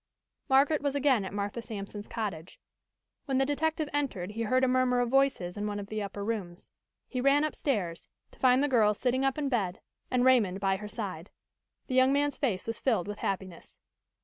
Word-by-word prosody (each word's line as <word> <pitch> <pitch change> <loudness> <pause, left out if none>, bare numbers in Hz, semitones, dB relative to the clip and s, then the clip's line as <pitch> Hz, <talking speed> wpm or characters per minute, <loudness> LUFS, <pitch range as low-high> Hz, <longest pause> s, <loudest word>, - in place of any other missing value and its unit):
Margaret 275 +3 +4
was 285 -1 -1
again 275 -6 +3
at - - -5
Martha 205 +3 -3
Sampson's 205 -2 -7
cottage. 190 -8 -5 0.7
When 270 -2 0
the 270 - +3
detective 310 +2 0
entered 235 -11 -2
he 225 +2 -5
heard 255 +4 +2
a - - +5
murmur 255 -1 +2
of 245 -1 +1
voices 260 -9 +1
in 205 +1 -2
one 205 0 -3
of 200 0 -7
the 215 0 -3
upper 200 0 -5
rooms. 195 -6 -5 0.4
He 255 - -3
ran 275 +3 +4
upstairs, 210 - -2 0.2
to - - -21
find 255 +1 +4
the - - +3
girl 220 -6 +3
sitting 255 +4 0
up 270 0 +1
in 295 -2 -1
bed 200 -9 -1 0.3
and 250 0 +2
Raymond 215 -8 +4
by 195 -1 +1
her 210 +1 -7
side. 195 -5 -6 0.6
The - - -5
young 260 +1 +5
man's 285 +1 +1
face 220 -10 -1
was 225 - -3
filled 220 -8 +1
with 205 0 -6
happiness. 185 -3 -5
230 Hz, 200 wpm, -29 LUFS, 200-270 Hz, 0.7 s, a